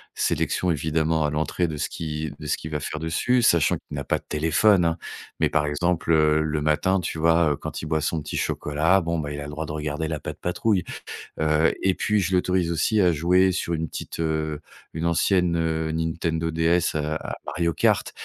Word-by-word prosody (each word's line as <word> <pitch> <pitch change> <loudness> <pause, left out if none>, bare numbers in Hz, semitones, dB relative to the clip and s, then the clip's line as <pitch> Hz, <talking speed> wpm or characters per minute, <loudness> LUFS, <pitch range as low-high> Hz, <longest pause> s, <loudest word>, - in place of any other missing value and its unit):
sélection 90 - 0
évidemment 80 +1 0
à - - +1
l'entrée 80 +4 -1
de 80 - -4
ce - - -1
qui 75 -2 -4
de 75 - -8
ce 75 - +1
qu'il 80 - -8
va 75 - -1
faire 75 - -4
dessus, 85 +11 +1
sachant 85 -10 +4
qu'il - - -10
n'a - - -3
pas - - +1
de - - -27
téléphone, 80 +6 +3
hein, 85 0 +1 0.4
mais - - +3
par 75 - +1
exemple, 85 +3 0
heu, 75 -1 +4
le 80 -1 -1
matin, 80 +6 +2
tu 80 - -4
vois, 85 -1 +4
heu, - - -3
quand - - -6
il - - -5
boit 80 0 +1
son 80 +2 -1
petit 75 - -6
chocolat, 80 +6 +1
bon, 85 0 -1
bah, 75 -2 -4
il 70 - -5
a - - -5
le - - -7
droit 75 +2 -4
de 75 - -6
regarder 75 +1 -3
la 80 -2 -3
Pat'Patrouille, 90 +1 -1 0.6
heu 80 +1 +3
et 95 - +3
puis 105 0 +1
je 95 -1 -1
l'autorise 90 -1 +1
aussi 85 +6 +1
à 90 -2 +4
jouer 90 +4 +3
sur 85 -1 -2
une 80 0 -2
petite, - - -7
heu, 80 -2 -1 0.3
une 80 +1 -3
ancienne, 90 +1 +2
heu, 80 -1 -1
Nintendo 80 0 -1
DS 85 +1 +1
à 75 0 -1
à - - -5
Mario 85 -1 0
Kart, - - +1
80 Hz, 215 wpm, -24 LUFS, 75-85 Hz, 0.6 s, sachant